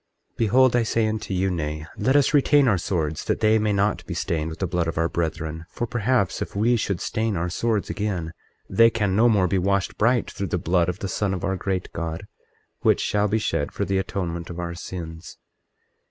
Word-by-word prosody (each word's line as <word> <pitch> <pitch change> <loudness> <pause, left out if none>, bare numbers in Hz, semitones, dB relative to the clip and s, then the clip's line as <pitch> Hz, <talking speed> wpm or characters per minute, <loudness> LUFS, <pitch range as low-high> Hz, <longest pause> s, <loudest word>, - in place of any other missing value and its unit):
24:13 - - -44
Behold, 125 +3 +4
I 120 - +4
say 115 0 +1
unto 110 -1 -3
you, 95 0 +1
Nay, 75 -2 -3
let 130 +7 +1
us 145 0 +4
retain 145 -1 +5
our 100 -6 +3
swords 80 -4 -2
that - - 0
they 110 0 +4
be 105 0 +1
not 100 +1 +1
stained 80 -2 -2
with 80 - -7
the 95 - -1
blood 85 -1 -1
of 85 - -3
our 85 0 +2
brethren; 80 -1 -3
for 120 - -3
perhaps, 120 -3 0
if - - -5
we 115 +4 +3
should 100 -5 -1
stain 110 -3 -1
our 90 +1 -2
swords 110 +1 0
again 90 -6 -3 0.3
they 115 0 +5
can 105 -5 0
no 115 +3 +5
more 100 -5 +3
be 95 +1 +1
washed 100 +1 0
bright 120 +1 +2
through 100 -1 -4
the 90 - -1
blood 85 0 +1
of 90 - -3
the 100 - -4
Son 95 +1 -1
of 95 - -6
our 95 -1 0
great 95 -1 -3
God, 85 -1 -4 0.5
which - - +3
shall 105 0 +1
be 105 +2 +1
shed 110 - -1
for - - -2
the 95 +1 0
atonement 85 -3 -3
of 85 - -7
our 85 -1 -4
sins. 85 -1 -8
95 Hz, 220 wpm, -24 LUFS, 85-110 Hz, 0.5 s, retain